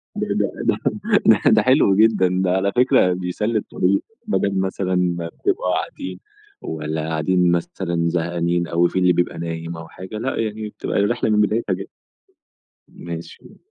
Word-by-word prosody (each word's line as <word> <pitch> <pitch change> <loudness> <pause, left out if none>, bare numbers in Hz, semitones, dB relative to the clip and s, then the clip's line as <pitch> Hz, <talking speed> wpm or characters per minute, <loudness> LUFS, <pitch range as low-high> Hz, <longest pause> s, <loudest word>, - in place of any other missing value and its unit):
ده - - -2
ده - - 0
ده - - +1 0.5
ده 110 - +5
ده، 110 - +5
حلو 130 -6 +4
جدًا 110 -3 +4
ده 90 - +1
على 95 +2 +1
فكرة 120 -7 +4
بيسلّي 95 +5 -1
الطريق، 100 -1 0 0.2
بدل 100 - 0
مثلًا 95 0 -1
ما 85 -2 0
بتبقوا 90 +2 -1
قاعدين، 90 0 -5 0.4
والّا 80 0 -4
قاعدين 85 +3 +2
مثلًا 85 0 -1
زهقانين، 85 0 0
أو 85 +1 +2
في 95 - -2
اللي 90 -1 +4
بيبقى 85 -1 -1
نايم 85 0 -5
أو 80 0 -9
حاجة، 95 +6 -8
لأ - - -2
يعني 110 -1 -3
بتبقى - - -5
الرحلة 110 +2 +1
من 105 0 +3
بدايتها 105 0 +1
ج 95 +2 -6 1.0
ماشي. 85 -1 -9
90 Hz, 160 wpm, -21 LUFS, 85-100 Hz, 1.0 s, ده